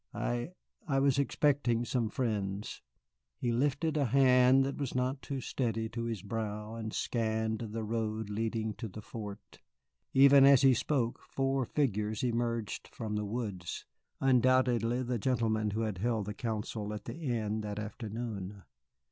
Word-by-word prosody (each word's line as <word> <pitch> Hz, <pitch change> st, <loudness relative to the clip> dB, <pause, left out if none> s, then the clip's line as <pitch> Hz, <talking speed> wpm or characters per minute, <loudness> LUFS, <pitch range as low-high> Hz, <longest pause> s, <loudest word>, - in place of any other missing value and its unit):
"I -, -, -2 dB, 0.4 s
I 135 Hz, -, +1 dB
was 135 Hz, 0 st, +3 dB
expecting 135 Hz, -3 st, +2 dB
some 115 Hz, -2 st, 0 dB
friends." 105 Hz, -5 st, -2 dB, 0.6 s
He 120 Hz, -, -1 dB
lifted 145 Hz, +5 st, +1 dB
a 145 Hz, -, +2 dB
hand 130 Hz, +1 st, +5 dB
that 140 Hz, -, -3 dB
was 140 Hz, -4 st, -3 dB
not 130 Hz, +2 st, 0 dB
too 140 Hz, -2 st, -4 dB
steady 115 Hz, -3 st, -2 dB
to 115 Hz, +1 st, -4 dB
his 115 Hz, -5 st, -3 dB
brow 105 Hz, 0 st, -4 dB
and 110 Hz, -1 st, -5 dB
scanned 110 Hz, -1 st, -1 dB
the 115 Hz, -1 st, -4 dB
road 110 Hz, -1 st, -2 dB
leading 110 Hz, +1 st, -2 dB
to 110 Hz, -, -4 dB
the 105 Hz, +1 st, -9 dB
fort. 105 Hz, -2 st, -8 dB, 0.5 s
Even 140 Hz, 0 st, +7 dB
as 140 Hz, -1 st, +7 dB
he 135 Hz, -1 st, +7 dB
spoke 120 Hz, -1 st, 0 dB
four 135 Hz, -1 st, -1 dB
figures 110 Hz, -6 st, -1 dB
emerged 115 Hz, -3 st, -1 dB
from 110 Hz, -3 st, -4 dB
the 105 Hz, 0 st, -1 dB
woods, 100 Hz, -6 st, -4 dB, 0.3 s
undoubtedly 125 Hz, -2 st, +3 dB
the 120 Hz, -1 st, -2 dB
gentlemen 110 Hz, -3 st, +1 dB
who 110 Hz, +2 st, -2 dB
had 105 Hz, -5 st, -2 dB
held 110 Hz, -1 st, 0 dB
the 105 Hz, -, -4 dB
council 105 Hz, -1 st, -3 dB
at 105 Hz, -, -8 dB
the 115 Hz, -, -6 dB
inn 110 Hz, -7 st, -1 dB
that 105 Hz, -1 st, -5 dB
afternoon. 105 Hz, -2 st, -5 dB
115 Hz, 155 wpm, -32 LUFS, 105-130 Hz, 0.6 s, Even